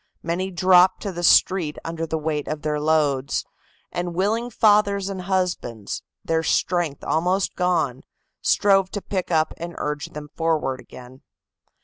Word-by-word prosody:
Many 175 +3 -2
dropped 185 +1 +4
to 200 - -3
the 175 -1 -5
street 175 -2 +4
under 165 0 -3
the 160 - -1
weight 150 -1 -2
of 155 -1 -4
their 150 -1 -1
loads, 150 -3 +1 0.5
and 175 -1 -3
willing 220 +6 0
fathers 205 -3 +3
and 190 -2 -5
husbands, 180 - -2 0.2
their 160 0 +1
strength 165 -3 0
almost 180 +4 0
gone, 160 -8 0 0.4
strove 195 -2 +3
to 205 - -3
pick 185 -3 -3
up 160 -2 +1
and 170 +1 -7
urge 150 0 -3
them 150 0 -9
forward 155 -5 0
again. 125 +2 -13
170 Hz, 145 wpm, -23 LUFS, 150-190 Hz, 0.5 s, dropped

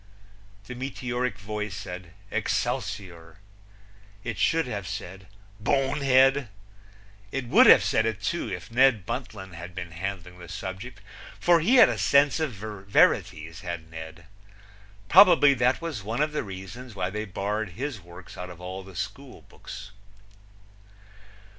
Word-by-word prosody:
The 125 - -7
meteoric 125 -1 -3
voice 105 -1 -5
said 90 -4 -8 0.2
"Excelsior!" 90 -5 -3 0.9
It 115 -5 -4
should 165 -1 +2
have 100 -6 -5
said 95 -1 -7 0.3
"Bonehead!" 135 +1 +3 0.8
It 135 -2 -3
would - - +7
have - - +8
said 110 +1 +2
it, 110 -2 -2
too, 115 - -2
if 90 +4 -6
Ned 120 -5 +4
Buntline 105 -6 -6
had 90 +2 -9
been 85 -2 -6
handling 90 0 -6
the 85 -2 -11
subject, 95 +5 -7 0.4
for 175 -1 +5
he 210 +12 +3
had 245 - +9
a - - -2
sense 140 +2 +4
of 155 -5 -1
verities, 95 -5 +1
had 85 -3 -6
Ned. 80 +1 -9 0.8
Probably 175 -6 +7
that 125 +4 +1
was 155 -10 -4
one 110 +5 -4
of 155 - -1
the 150 - -1
reasons 100 +4 -9
why 95 -1 -2
they 105 +2 -3
barred 100 0 -3
his 130 0 -5
works 85 +1 -13
out 90 0 -6
of 90 -1 -11
all 90 +1 -6
the 95 -1 -13
schoolbooks. 100 +4 -8
105 Hz, 140 wpm, -26 LUFS, 90-130 Hz, 0.9 s, had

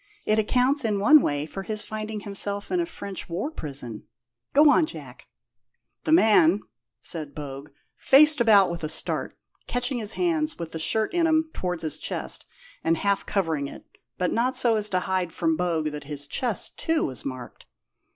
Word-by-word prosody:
It 215 +1 +2
accounts, 255 +6 +2
in 210 -3 0
one 300 +9 +7
way, 145 -5 -1
for 195 +5 -7
his 215 +1 -3
finding 215 0 -5
himself 200 0 -3
in 360 - +1
a 340 - -1
French 200 - -7
war 190 - -3
prison. 135 - -3 0.4
Go 295 +2 +6
on, 310 - +3
Jack." - - -10 0.8
"The - - 0
man 210 - +5 0.4
(said 155 -4 -2
Bogue) 140 -1 -7 0.3
faced 300 0 +6
about 205 -6 +5
with 170 -1 -6
a 155 - -2
start, - - -3 0.3
catching 245 +1 0
his 215 -1 -3
hands 320 -3 0
with 170 -2 -6
the 160 - -5
shirt 220 - 0
in 340 -2 +2
'em 315 0 +1
towards 180 -2 -3
his 155 -2 -2
chest, - - -2 0.4
and 165 0 +2
half 200 +3 0
covering 160 -8 -1
it, - - -11 0.3
but 180 -1 0
not 250 +3 0
so 235 -2 +4
as 210 -1 0
to 185 -2 0
hide 185 -2 -1
from 160 0 0
Bogue 165 -3 -1
that 150 -1 -8
his 145 -1 -5
chest, 225 - -2
too, 325 -1 +1
was 130 -3 -6
marked. 130 -3 -8
200 Hz, 180 wpm, -25 LUFS, 160-250 Hz, 0.8 s, one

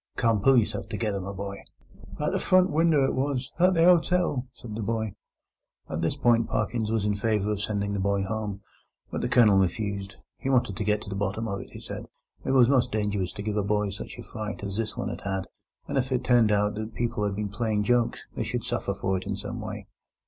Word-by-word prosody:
"Come, 115 -4 +2
pull 135 +4 +6
yourself 115 - 0
together, 105 -4 -1
my 95 +2 -5
boy." 100 0 -6 0.6
"The - - 0
front 185 -1 +4
winder 155 -2 +4
it - - 0
was, 135 -1 -1
at 180 +1 +5
the 165 - +3
'otel," 175 -6 +3
said 120 -3 -10
the 110 - -3
boy. 110 -1 -1 0.7
At 80 - -3
this 85 +10 +1
point 120 -4 +3
Parkins 110 +1 -1
was 110 -2 0
in 105 - +2
favour 105 0 0
of 105 -1 -2
sending 100 -1 -1
the 100 - -1
boy 100 0 +1
home, 105 0 -3 0.5
but - - -2
the - - -1
Colonel 105 -5 +6
refused; 100 +1 -1 0.2
he 135 - -2
wanted 120 -7 +2
to - - -1
get 105 +1 +1
to - - -8
the - - -2
bottom 100 +3 -1
of 100 -2 -3
it, - - -11
he - - -10
said; - - -7 0.4
it - - -3
was 130 -3 +6
most 130 -2 +3
dangerous 105 -3 -1
to 100 - -6
give 105 0 -2
a 105 - +2
boy 105 0 +1
such 100 - -8
a - - -7
fright 105 -2 -6
as 100 -1 -4
this 110 0 -3
one - - -2
had - - -6
had, 95 -1 -2 0.4
and 135 - +1
if 130 +1 -2
it 125 - +1
turned 120 -3 +4
out 105 0 +2
that 110 +1 -5
people 115 -3 -1
had 100 -1 0
been 105 0 -2
playing 105 0 0
jokes, 120 +2 +1
they - - -2
should - - -3
suffer 100 - -2
for 95 -1 0
it 90 - -7
in 100 - -1
some 110 +3 -5
way. 105 -1 -6
105 Hz, 235 wpm, -27 LUFS, 100-120 Hz, 0.7 s, pull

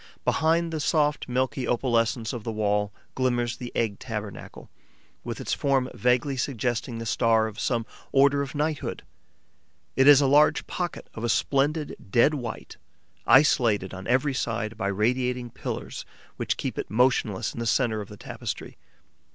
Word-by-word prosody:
Behind 165 +1 +2
the 160 - -2
soft, 150 -3 +1
milky 130 +1 -1
opalescence 115 -1 0
of 120 -3 -5
the 115 - -3
wall 105 -1 0 0.2
glimmers 120 -2 0
the 125 -1 -7
egg 110 -4 -1
tabernacle, 105 -4 -7 0.6
with - - -5
its - - -2
form 135 -2 +1
vaguely 125 +3 +1
suggesting 120 -2 -2
the 115 - -5
star 115 -1 +3
of 110 -2 -6
some 115 -3 0 0.3
order 140 +1 +4
of 140 +1 -5
knighthood. 150 +1 -2 0.9
It 135 +1 +4
is 145 -2 +9
a 145 - +3
large 145 +3 +4
pocket, 175 -2 -4
of 115 - -7
a 120 - 0
splendid 140 +6 +1
dead 120 +9 +4
white, 120 -6 -6 0.5
isolated 115 -7 +4
on 95 0 -7
every 130 +3 +2
side 115 -3 -2
by - - -2
radiating 125 +4 0
pillars - - -5 0.3
which - - -2
keep - - -4
it - - -4
motionless 115 -4 +1
in - - -7
the 115 - -2
centre 110 -3 +1
of 100 - -9
the 105 - -10
tapestry. - - -6
125 Hz, 160 wpm, -26 LUFS, 115-140 Hz, 0.9 s, is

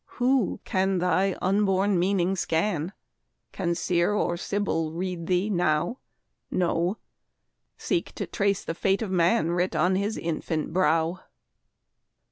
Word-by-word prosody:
Who 255 -3 +2
can 190 0 +1
thy 185 +2 +1
unborn 195 0 +2
meaning 190 0 +1
scan? 170 0 -1 0.6
Can 170 -1 -1
Seer 175 +2 +1
or 175 -4 0
Sibyl 170 -4 -2
read 175 -1 -4
thee 185 +2 +1
now? 175 - 0 0.5
No, 175 +2 0 0.8
seek - - -1
to - - -3
trace 200 -2 0
the - - -3
fate 195 +5 +1
of 200 - -4
man 175 0 +2
Writ 180 +1 0
on 180 +1 +3
his 205 +3 -1
infant 160 -1 -3
brow. 170 -1 +2
185 Hz, 125 wpm, -26 LUFS, 170-195 Hz, 0.8 s, on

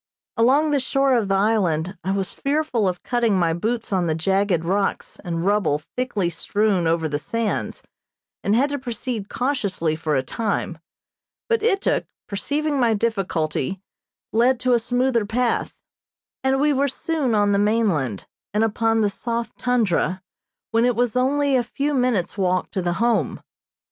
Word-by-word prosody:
Along 270 +6 +3
the 285 - +3
shore 270 0 +2
of 225 -4 +1
the 195 - +1
island 190 -4 +1
I 185 - -3
was 195 0 -1
fearful 280 -7 0
of 180 -1 -6
cutting 235 -5 +1
my 170 -2 +2
boots 225 +5 -2
on 180 -2 +1
the 160 - +1
jagged 190 0 +1
rocks 195 +3 -1
and 170 -1 -3
rubble 190 -8 +1
thickly 245 -7 -1
strewn 195 +1 0
over 165 -1 +1
the 145 -1 -2
sands, 230 +6 -3 0.6
and 205 - +2
had 280 +5 +2
to 285 - -2
proceed 240 -3 -4
cautiously 200 - -1
for 155 -1 -1
a 130 - +1
time, 195 - -2 0.7
but 460 -2 +1
Ituk, 415 -3 +1 0.2
perceiving 290 +8 -1
my 235 -3 +3
difficulty, 190 - -1 0.5
led 240 +3 +3
to 255 -1 +2
a 240 - +4
smoother 245 0 +1
path, 240 +2 0 0.7
and 265 0 +2
we 295 +1 +3
were 280 +1 +2
soon 280 -3 -1
on 205 -1 +3
the 200 - +2
mainland, 200 - +1 0.3
and 215 - +3
upon 225 +1 +1
the 210 - +3
soft 235 +2 -4
tundra, 205 -6 +1 0.5
when 230 0 +3
it 245 -1 +2
was 245 0 0
only 275 +2 +2
a 255 - +4
few 280 +5 -2
minutes 245 -8 0
walk 185 -1 0
to 190 - -2
the 175 -1 0
Home. 215 - +1
220 Hz, 165 wpm, -22 LUFS, 185-250 Hz, 0.7 s, a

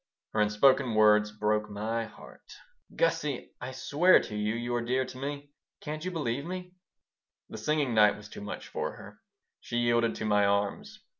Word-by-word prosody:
Her 110 - +2
unspoken 115 +3 +3
words 105 0 +5
broke 105 0 0
my 110 +3 -2
heart - - -14 0.4
"Gussie! 150 - -1
I 125 - -5
swear 150 +7 +4
to 105 - -7
you 105 +1 -1
you're 120 0 -2
dear 130 +2 0
to 130 - -10
me. 145 +1 -5 0.3
Can't 155 +1 -6
you 185 - -2
believe 140 -6 -2
me?" 180 +2 -6 0.8
The 110 - -7
singing 145 +1 0
night 105 -1 +5
was 105 0 -11
too - - -10
much 105 - -7
for - - -3
her. - - -13 0.4
She 120 - -5
yielded 120 -1 +2
to 110 - -4
my 105 -1 +3
arms. 100 0 -1
120 Hz, 170 wpm, -29 LUFS, 105-140 Hz, 0.8 s, words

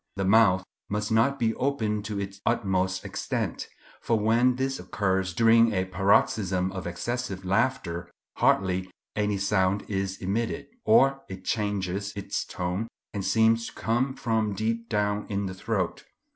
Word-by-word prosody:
The 95 -1 -1
mouth 95 -2 +5 0.3
must 105 +1 -2
not 115 +5 +3
be 115 -3 +1
opened 110 -6 -1
to 105 -1 -3
its 100 0 -6
utmost 95 -5 0
extent, - - -3 0.3
for 115 - +1
when 120 +4 +3
this 135 +1 -2
occurs 95 -2 -1
during 115 +3 +5
a 95 -1 +1
paroxysm 95 0 +2
of 95 -2 -5
excessive 95 +1 -4
laughter 90 -4 0 0.3
hardly 95 -1 +2 0.3
any 105 -1 0
sound 100 0 +1
is 95 -1 -2
emitted; 105 +5 -2 0.2
or 135 -11 +5
it 95 0 -8
changes 100 -2 -1
its 100 0 -3
tone 90 +4 -3 0.3
and 100 -2 -3
seems 115 +3 +3
to - - -9
come 125 +4 0
from 110 -4 0
deep 115 +3 -2
down 105 -1 0
in 100 -1 -1
the 95 - -4
throat. 95 -1 -2
100 Hz, 145 wpm, -27 LUFS, 95-115 Hz, 0.3 s, mouth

